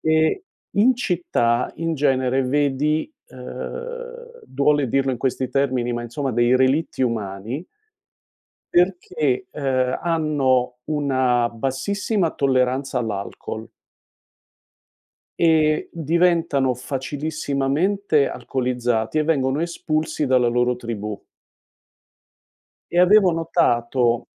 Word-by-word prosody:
e 160 - +2 0.3
in 235 +6 +4
città 170 - 0
in 165 0 -2
genere 135 -2 +1
vedi, 145 - 0 0.2
ehm, 485 0 -8
duole 140 0 +1
dirlo 135 +2 +1
in 125 - -4
questi 130 0 -1
termini, 130 -3 0
ma 120 0 -3
insomma 135 +4 -3
dei 120 +2 +3
relitti 130 +3 +1
umani 115 - -3 1.1
perché, 175 -6 +1
ehm, 130 -3 0
hanno 145 -7 +1
una 130 -5 +1
bassissima 160 - -1
tolleranza 130 -1 0
all'alcol 110 0 -5 1.7
e 155 -2 +3
diventano 165 -5 +1
facilissimamente 145 +5 -1
alcolizzati 125 -1 -2
e 155 - +4
vengono 140 -2 +1
espulsi 155 -3 -2
dalla 125 -2 +3
loro 125 +1 +1
tribù. 110 -4 -5 1.7
E 175 - +1
avevo 190 +1 +6
notato 120 -8 +1
135 Hz, 90 wpm, -22 LUFS, 125-160 Hz, 1.7 s, avevo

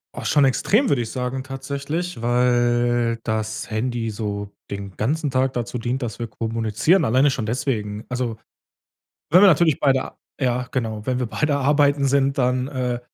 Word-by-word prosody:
Ach, - - -6
schon 145 - +3
extrem, 215 - +2
würde 120 -4 +2
ich 110 - -7
sagen 130 +1 -3
tatsächlich, 140 +5 -4
weil 120 -1 +2
das 110 -1 -3
Handy 115 +1 -2
so 100 -2 -4 0.2
den 100 -1 -6
ganzen 145 +6 0
Tag 130 +1 +1
dazu 120 0 -3
dient, 125 +3 -2
dass 115 -4 -4
wir 120 - -3
kommunizieren, 115 - +1
alleine 130 +5 +4
schon 125 -4 -2
deswegen. 110 -3 -2
Also, 125 -3 -2 0.9
wenn 175 +4 +7
wir 205 - +8
natürlich 160 -3 +3
beide 135 -2 +1 0.3
ja 125 -1 0
genau, 110 -5 -3
wenn 125 +1 -1
wir 125 - -1
beide 145 +5 0
arbeiten 140 0 +3
sind, 135 0 +2
dann, 125 +1 +1
äh, 125 -3 -2
125 Hz, 165 wpm, -22 LUFS, 115-140 Hz, 0.9 s, wir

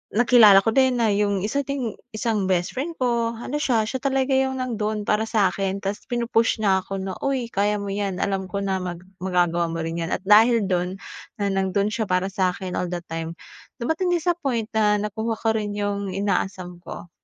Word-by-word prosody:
nakilala 225 -4 +7
ko 225 - +2
din 260 -2 +4
na 225 -2 +3
yung 200 -1 +1
isa 250 +7 -1
ding 265 -6 -3 0.2
isang 215 -4 0
bestfriend 255 - -1
ko 235 -2 0
ano 250 +5 -4
siya, 240 -7 +2
siya 260 +2 -3
talaga 270 0 +1
yung 265 0 +1
nando'n 215 -3 -2
para 210 +1 +2
sa'kin 195 -2 0
ta's 200 +1 -3
pinu-push 235 -2 +1
niya 190 -2 +4
ako 195 0 -5
na, 190 -1 -4
"Uy 270 -3 0
kaya 205 +1 +1
mo 200 - -5
yan, 200 -1 -2
alam 195 -1 -1
ko 200 +2 -3
na 190 -1 -1
mag 175 -1 -6 0.2
magagawa 175 -2 +1
mo 165 - -4
rin 165 +1 -3
yan." 165 - -4
At - - -3
dahil 225 +1 +6
dun 180 0 -1 0.4
na 200 -1 0
nando'n 195 +1 0
siya 220 -1 -2
para 185 +1 +1
sa'kin 185 -2 -1
all 180 - -1
the 175 -1 -4
time 165 0 -5 0.5
dumating 320 +8 0
din 335 -2 0
sa 350 -2 +2
point 235 -8 -1
na 210 -1 +3
nakuha 220 +2 -2
ko 225 - +1
rin 205 -2 -2
yung 200 -1 -2
inaasam 185 -3 -2
ko. 175 - -9
205 Hz, 200 wpm, -23 LUFS, 190-235 Hz, 0.5 s, nakilala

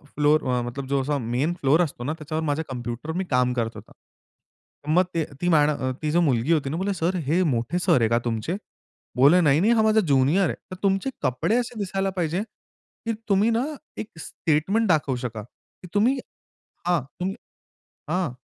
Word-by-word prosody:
Floor 150 +1 +3
अ, 125 -1 0
मतलब 125 +3 -5
जो 140 0 +1
असा 145 +2 -1
मेन 125 +7 -1
फ्लोअर 145 +5 +4
असतो 140 -7 -2
ना, 150 - -1
त्याच्यावर 155 +1 -3
माझ्या 155 +1 -1
कॉम्प्युटरवर 125 +5 -5
मी 190 - 0
काम 125 -1 +2
करत 115 -2 -1
होता. - - -12 1.0
मग 175 +4 +4
ते, 165 -2 0 0.2
ती 175 - 0
मॅड 150 -3 +5
अ, 130 -3 -1
ती 155 -1 -1
जो 175 +2 +3
मुलगी 135 -2 +1
होती 145 -4 0
ना 160 - -2
बोले," 195 +2 -1
सर 180 +1 -1
हे 170 +5 +3
मोठे 130 +3 0
सर 175 -6 +3
आहे 110 - +3
का 115 - +3
तुमचे?" 120 - -1 0.6
बोले, 140 +8 +6
"नाही-नाही 165 +9 +4
हा 225 - +3
माझा 220 0 +4
ज्युनियर 150 +2 +3
आहे. - - -2 0.2
तर - - -4
तुमचे 195 +6 +1
कपडे 130 - +1
असे 245 -2 -3
दिसायला 195 -1 -1
पाहिजे, 175 +2 0 0.6
की 230 - 0 0.2
तुम्ही 200 +3 +4
ना 230 +2 +1 0.3
एक 220 - -5
स्टेटमेंट 170 +9 0
दाखवू 145 -6 +2
शका, 110 -3 -4
की 180 - -18
तुम्ही 235 +7 +3 0.7
हां, 175 -3 +3 0.2
तुम्ही 190 +2 -2 0.7
हां. 175 -4 0
155 Hz, 190 wpm, -24 LUFS, 130-185 Hz, 1.0 s, बोले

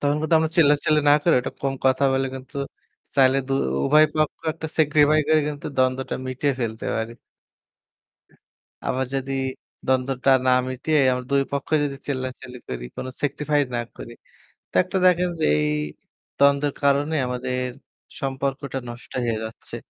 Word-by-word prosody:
তখন 145 0 +1
কিন্তু 155 +1 +1
আমরা 160 0 0
চিল্লাচিল্লি 150 -1 +4
না - - +8
করে 170 - +4
একটু 125 - -4
কম 135 -1 0
কথা 130 +1 +3
বলে 135 0 +1
কিন্তু 130 +2 -10 0.6
চাইলে 135 -1 +5
দু - - -1 0.3
উভয় 155 +2 +6
পক্ষ 155 -1 0
একটা 160 0 -6
sacrifice 150 0 +4
করে 155 0 +5
কিন্তু 145 -1 -6
দ্বন্দ্বটা 130 0 +1
মিটিয়ে 130 +2 -1
ফেলতে 110 -2 -3
পারি। 110 +1 -3 1.7
আবার 130 +1 0
যদি 135 0 -2 0.5
দ্বন্দ্বটা 130 +1 +1 0.2
না - - +5 0.2
মিটিয়ে 140 +4 0
আমরা 125 0 -2
দুইপক্ষই 140 +2 +1
যদি 140 -1 -3
চিল্লাচিল্লি 130 -2 -5
করি, - - -5
কোনো 130 - -5
sacrifice 145 0 0
না - - 0 0.2
করি, 120 - -9 0.6
তো - - -24
একটা - - -3
দেখেন 180 0 +4
যে - - +2
এই 75 0 +1 0.7
দ্বন্দ্বের 140 0 +3
কারণে 140 +3 +2
আমাদের 125 0 -2 0.6
সম্পর্কটা 135 0 -3
নষ্ট 120 +1 -10
হয়ে 115 -2 0
যাচ্ছে 110 0 -8
135 Hz, 150 wpm, -23 LUFS, 130-150 Hz, 1.7 s, না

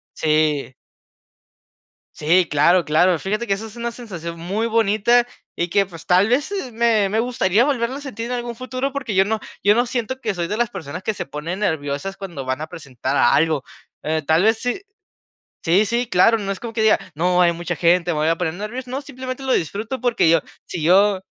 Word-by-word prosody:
Sí. 150 -4 +1 1.4
Sí, 170 +3 +3
claro, 165 +4 +3
claro. 170 +4 +3
Fíjate 215 +8 -3
que 200 - +2
eso 200 +3 -4
es 220 - -11
una 235 0 -3
sensación 170 -9 -7
muy 200 +7 -2
bonita, 225 +2 +3 0.3
y 170 +1 -1
que, 195 +2 +2
pues, 165 -3 -12
tal 185 +4 +4
vez, 280 +9 +1
e 385 -11 -4
me 225 -3 +2
me 215 +3 0
gustaría 230 -3 +2
volverlo 260 -3 -1
a 285 - -7
sentir 235 -5 -6
en 250 - -3
algún 240 -1 -4
futuro. 255 +2 -4
Porque 260 -7 -3
yo 190 +1 +5
no 220 +1 -1 0.2
yo 205 - +6
no 240 +3 +1
siento 250 +2 -3
que 215 -5 -2
soy 170 -1 -2
de 210 - -2
las 240 -1 +1
personas 165 -2 -7
que 215 +2 -2
se - - -4
ponen 150 +7 -5
nerviosas 160 -1 -2
cuando 175 -10 -7
van 130 +3 -2
a 155 - -4
presentar 140 -3 -4
algo, 150 +3 +3 0.4
eh, 155 +1 0
tal 160 +4 +3
vez 220 +1 +3
si 245 +10 -2 0.8
Sí 180 +6 +3
sí, 235 +3 -1
claro, 225 +3 +4
no 195 -1 -3
es 195 - -5
como 235 -1 -7
que 225 - -1
diga: 220 0 +5 0.2
"No, 180 +3 +2
hay 170 - +4
mucha 175 +1 -4
gente, 175 +1 +2
me 160 - -2
voy 155 - +1
a 165 - +2
poner 165 -2 -2
nervioso", 240 +6 -6
no, 260 +2 -3
simplemente 260 -1 -7
lo 265 -1 +1
disfruto 215 - -2
porque 240 -9 +2
yo 165 -1 +4 0.2
si 170 - -5
yo 190 +3 +4
200 Hz, 215 wpm, -21 LUFS, 165-235 Hz, 1.4 s, yo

